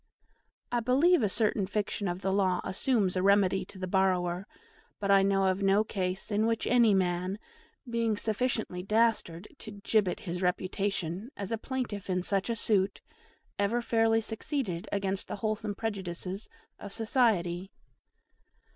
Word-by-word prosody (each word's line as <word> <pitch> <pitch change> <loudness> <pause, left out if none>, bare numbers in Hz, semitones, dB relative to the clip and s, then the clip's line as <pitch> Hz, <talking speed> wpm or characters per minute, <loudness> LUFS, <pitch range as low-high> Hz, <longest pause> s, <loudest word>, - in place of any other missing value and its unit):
I 240 - +2
believe 275 +9 +4
a 210 - +2
certain 210 -1 +1
fiction 205 0 -2
of 175 +1 -3
the 190 0 0
law 190 -2 +2
assumes 195 -1 0
a 185 - +1
remedy 195 -1 +3
to - - -13
the 185 - -3
borrower; 185 -1 +1 0.5
but 200 -1 0
I 195 0 +7
know 195 0 +2
of 190 +1 +1
no 195 +2 +4
case 190 -2 -3
in 210 +2 +2
which 230 -1 0
any 235 -4 +4
man, 185 +1 0 0.5
being 230 -2 0
sufficiently 220 -4 -1
dastard 210 -4 +1
to 220 - -9
gibbet 205 -5 +1
his 175 -1 -4
reputation 185 +1 -2
as 200 +2 -4
plaintiff 235 -7 -4
in 180 -1 0
such 195 +3 0
a 230 - 0
suit, 200 -3 +1 0.6
ever 205 +4 +1
fairly 225 -1 +2
succeeded 220 - -3
against 195 -1 -1
the - - -4
wholesome 215 0 -2
prejudices 195 -2 -4 0.3
of 200 - -8
society. 195 -6 +1
200 Hz, 145 wpm, -30 LUFS, 185-225 Hz, 0.6 s, I